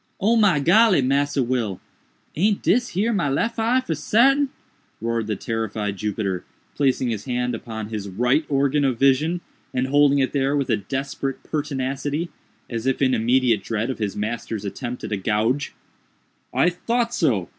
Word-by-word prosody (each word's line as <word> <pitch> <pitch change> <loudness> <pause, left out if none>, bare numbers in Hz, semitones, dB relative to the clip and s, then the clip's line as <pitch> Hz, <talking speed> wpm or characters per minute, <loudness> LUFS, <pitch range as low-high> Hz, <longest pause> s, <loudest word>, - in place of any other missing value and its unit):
"Oh, 215 +4 +3
my 205 -9 +4
golly, 185 - +5
Massa 140 +1 +1
Will! 115 -6 -1 0.6
aint 200 +5 +1
dis 245 +5 +3
here 225 +4 +2
my 175 -8 +1
lef 230 +12 -1
eye 240 +3 +2
for 170 - -2
sartain?" 270 - +3 0.5
roared 115 -1 -2
the 105 - -1
terrified 110 -2 -3
Jupiter, 100 -3 -2 0.3
placing 130 -3 +1
his 105 -3 -4
hand 125 -1 -1
upon 110 -2 -6
his 105 -3 -5
right 125 - +2
organ 140 +1 +2
of 130 -4 +1
vision, 145 +7 +2 0.3
and 125 0 +1
holding 145 +1 +4
it 130 -3 +1
there 140 0 +1
with 135 -3 -1
a 110 - +3
desperate 135 +5 -4
pertinacity, 145 +2 -2 0.4
as 115 +1 -4
if 135 - +1
in 130 -2 +3
immediate 120 -1 +2
dread 115 +3 -2
of 130 - -7
his 105 -3 -2
master's 110 -1 -4
attempt 120 +5 -5
at - - -5
a 105 - 0
gouge. 110 +7 0 0.8
"I 180 - +3
thought 235 +6 -1
so! 110 - +1
130 Hz, 165 wpm, -23 LUFS, 115-150 Hz, 0.8 s, golly